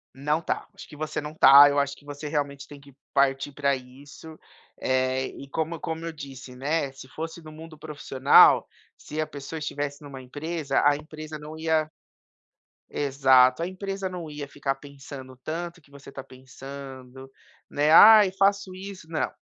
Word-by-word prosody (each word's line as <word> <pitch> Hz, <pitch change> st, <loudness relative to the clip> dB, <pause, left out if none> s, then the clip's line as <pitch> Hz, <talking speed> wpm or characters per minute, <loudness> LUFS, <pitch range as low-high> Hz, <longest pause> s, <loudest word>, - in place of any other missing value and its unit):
Não 150 Hz, +4 st, -1 dB
tá, -, -, -3 dB
acho -, -, -11 dB
que -, -, -13 dB
você 155 Hz, +1 st, -4 dB
não 150 Hz, +1 st, -7 dB
tá. 140 Hz, -1 st, +9 dB
Eu 145 Hz, 0 st, +1 dB
acho 140 Hz, 0 st, -1 dB
que 145 Hz, -, -21 dB
você 145 Hz, +1 st, -7 dB
realmente 145 Hz, -2 st, -3 dB
tem 145 Hz, -1 st, -12 dB
que 140 Hz, -1 st, -18 dB, 0.2 s
partir 140 Hz, 0 st, +2 dB
pra 140 Hz, -1 st, 0 dB
isso, 140 Hz, +5 st, -13 dB, 0.4 s
eh, 130 Hz, 0 st, 0 dB
e 140 Hz, -, -11 dB
como 160 Hz, +2 st, -3 dB
como 165 Hz, 0 st, -5 dB
eu 165 Hz, -, -4 dB
disse, 135 Hz, -4 st, -10 dB
né, 140 Hz, +1 st, -1 dB
se 135 Hz, -1 st, -13 dB
fosse 165 Hz, +4 st, -7 dB
no 155 Hz, -, -11 dB
mundo 160 Hz, 0 st, -12 dB
profissional, 145 Hz, -3 st, +4 dB, 0.3 s
se 155 Hz, -, -8 dB
a 155 Hz, -, +1 dB
pessoa 150 Hz, +1 st, -8 dB
estivesse 145 Hz, -1 st, -5 dB
numa 140 Hz, -2 st, -9 dB
empresa 145 Hz, +2 st, -2 dB
a 145 Hz, 0 st, +5 dB
empresa 155 Hz, 0 st, -9 dB
não 155 Hz, +1 st, -9 dB
ia 160 Hz, -1 st, 0 dB, 1.0 s
exato 135 Hz, 0 st, +3 dB
a -, -, -1 dB
empresa 195 Hz, +1 st, -5 dB
não 175 Hz, -4 st, -7 dB
ia 145 Hz, -1 st, -6 dB
ficar 135 Hz, -1 st, -3 dB
pensando 135 Hz, -2 st, -11 dB
tanto 170 Hz, +2 st, -5 dB
que 140 Hz, -, -26 dB
você 140 Hz, 0 st, -13 dB
tá 135 Hz, -, -7 dB
pensando, 130 Hz, 0 st, -11 dB, 0.4 s
né: 145 Hz, +1 st, +1 dB
"Ai 210 Hz, +1 st, +9 dB
faço 200 Hz, -1 st, +1 dB
isso" 190 Hz, -3 st, -10 dB
não, 160 Hz, -, -2 dB
145 Hz, 175 wpm, -25 LUFS, 135-160 Hz, 1.0 s, tá